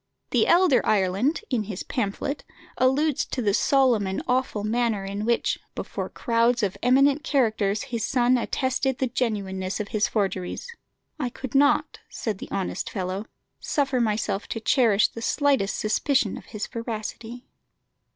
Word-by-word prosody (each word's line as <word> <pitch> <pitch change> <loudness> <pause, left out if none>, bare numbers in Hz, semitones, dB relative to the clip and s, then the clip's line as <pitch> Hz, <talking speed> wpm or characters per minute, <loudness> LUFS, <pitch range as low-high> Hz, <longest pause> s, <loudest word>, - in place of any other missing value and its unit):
The - - +3
elder 345 -6 +5
Ireland, 205 - +1
in 225 -5 0
his 195 -2 -5
pamphlet, 245 +5 -3 0.3
alludes 270 +3 +2
to - - -5
the 210 -5 +1
solemn 250 -5 +3
and 190 - -3
awful 250 -4 0
manner 220 -2 0
in 200 +2 -4
which, 235 0 +1 0.2
before - - -4
crowds 235 -1 +1
of 195 -2 0
eminent 275 +4 +4
characters, 220 -9 +1
his 240 -5 -3
son 245 0 +3
attested 260 +1 0
the 265 - 0
genuineness 200 -6 -2
of 210 - -4
his 215 -1 +1
forgeries. 195 -4 -2 0.5
"I 255 -4 -1
could 260 0 -8
not," 285 +1 +3
says 215 -4 -3
the - - -9
honest 190 -2 -3
fellow, 190 +2 -4 0.3
"suffer 275 -4 0
myself 210 -2 -1
to 225 - -4
cherish 220 -2 +3
the 230 - -9
slightest 275 -5 +1
suspicion 220 +1 +1
of - - -10
his 215 -2 -5
veracity." 230 +1 -6
230 Hz, 150 wpm, -25 LUFS, 205-260 Hz, 0.5 s, elder